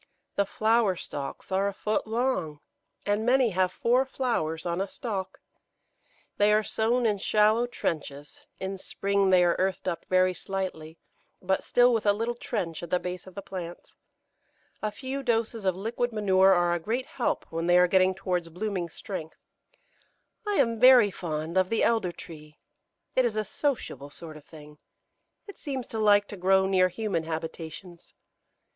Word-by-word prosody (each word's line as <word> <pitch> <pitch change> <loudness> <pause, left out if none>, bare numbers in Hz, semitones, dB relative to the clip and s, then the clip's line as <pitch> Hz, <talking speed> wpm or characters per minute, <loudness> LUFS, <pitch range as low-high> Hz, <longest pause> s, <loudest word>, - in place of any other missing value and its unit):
The 200 -1 +1
flower 220 -2 +2
stalks 145 +1 -7
are 195 +1 +2
a 200 - -2
foot 215 +1 -1
long, 220 - -1 0.5
and 205 +1 +1
many 250 -1 +3
have 185 0 +1
four 245 +6 +2
flowers 230 -13 -2
on 175 +1 -1
a 195 - -1
stalk. 200 -5 -5 1.0
They 205 +1 +4
are 215 +1 +3
sown 235 +3 0
in 210 -3 +1
shallow 215 +4 +3
trenches; 145 - -5
in 190 0 -4
spring 200 0 0
they 185 -1 +5
are 175 -1 +3
earthed 190 0 -1
up 170 -2 -3
very 185 0 +3
slightly, 180 -4 -5 0.4
but 190 +1 -1
still 245 0 +4
with 220 -2 0
a 205 - +6
little 230 +3 -2
trench 165 -8 -4
at 170 - -7
the 180 - +2
base 180 0 -6
of 185 - -13
the 200 - -6
plants. 175 -2 -8 0.9
A 215 - -1
few 260 +6 -5
doses 230 -4 -1
of 185 -2 +2
liquid 235 +5 -2
manure 195 -3 +4
are 175 -2 +3
a 175 - 0
great 235 +9 -2
help 250 - -2
when 165 +1 -2
they 175 0 +5
are 180 - +6
getting 185 +1 +3
towards 180 -3 -2
blooming 180 0 -3
strength. 160 -2 -7 1.1
I 415 - +1
am 230 - +2
very 250 -4 +7
fond 165 0 -2
of 185 0 +1
the 225 - +1
Elder 225 -6 +2
tree. 155 -3 -12 0.6
It 255 - +4
is 235 -3 0
a 215 0 -1
sociable 205 - -3
sort 155 +1 -10
of 150 -1 -13
thing; 150 -1 -14 0.7
it 405 - -12
seems 265 -5 -4
to 220 - -2
like 205 -1 +4
to 205 - -7
grow 190 +1 +3
near 185 -1 +4
human 185 -5 -2
habitations. 165 +2 -7
190 Hz, 170 wpm, -27 LUFS, 175-225 Hz, 1.1 s, very